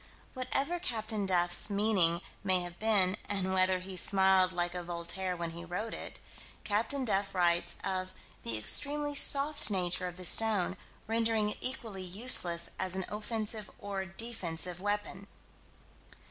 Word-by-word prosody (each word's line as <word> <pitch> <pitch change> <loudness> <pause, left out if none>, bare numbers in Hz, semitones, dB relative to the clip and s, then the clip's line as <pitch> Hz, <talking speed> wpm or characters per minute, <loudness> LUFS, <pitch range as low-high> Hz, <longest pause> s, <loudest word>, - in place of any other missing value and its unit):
Whatever 275 +6 -2
Captain 215 - -2
Duff's 175 +1 +2
meaning 200 -5 +2 0.2
may 185 -2 +3
have 175 0 -8
been, 205 -3 +2
and 190 -2 -1
whether 185 0 +3
he 185 +1 -7
smiled 190 0 +3
like 175 -1 -1
a 180 - -4
Voltaire 175 +2 -4
when 170 -1 -4
he 170 +1 -8
wrote 180 +6 -5
it, - - -7 0.5
Captain 230 +6 -1
Duff 195 -3 -1
writes 175 -1 +3
of 185 -1 -1 0.3
"the 115 -1 -1
extremely 290 - +2
soft 285 -3 +6
nature 180 -2 0
of 180 0 -8
the 185 - -4
stone, 205 -2 +2 0.3
rendering 225 -1 0
it - - -5
equally 225 -6 -3
useless 180 -3 +2
as 185 -1 -2
an 190 -1 -2
offensive 215 0 -4
or 200 -2 -4
defensive 185 -4 -3
weapon." 205 -1 -3
190 Hz, 145 wpm, -31 LUFS, 180-220 Hz, 0.5 s, soft